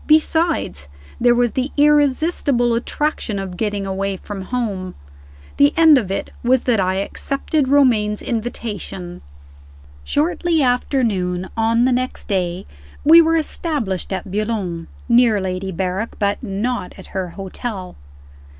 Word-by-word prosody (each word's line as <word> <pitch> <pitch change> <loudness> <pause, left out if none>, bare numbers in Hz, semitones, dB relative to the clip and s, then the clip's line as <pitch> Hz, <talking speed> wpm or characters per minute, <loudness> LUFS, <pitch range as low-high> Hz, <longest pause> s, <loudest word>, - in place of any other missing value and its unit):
Besides, 315 - +2 0.3
there 240 0 +4
was 240 -1 +2
the 260 +2 -2
irresistible 290 -3 +3
attraction 240 -2 -2
of 190 -2 -5
getting 205 0 -2
away 195 0 -2
from 200 +1 -7
home. 195 -4 -3 0.6
The 285 +1 +4
end 320 -4 +7
of 205 -6 -5
it 195 - -3
was 250 +1 +2
that 240 -4 +2
I 185 0 +1
accepted 275 +8 -1
Romayne's 235 -7 +3
invitation. 210 -6 -4
II. - - -17 0.8
SHORTLY 175 - +1
after 250 +1 +1
noon, 185 -4 -1
on 230 +1 +2
the 260 - +3
next 255 +1 -2
day, 185 -2 -1 0.4
we 330 +3 +8
were 330 0 +2
established 290 - -2
at 190 0 -4
Boulogne 200 -6 -2 0.2
near 235 -3 +4
Lady 190 0 -3
Berrick, 190 +4 -3
but 200 0 0
not 225 -1 -3
at - - -11
her 190 -2 -2
hotel. 195 0 -6
225 Hz, 135 wpm, -20 LUFS, 190-260 Hz, 0.8 s, we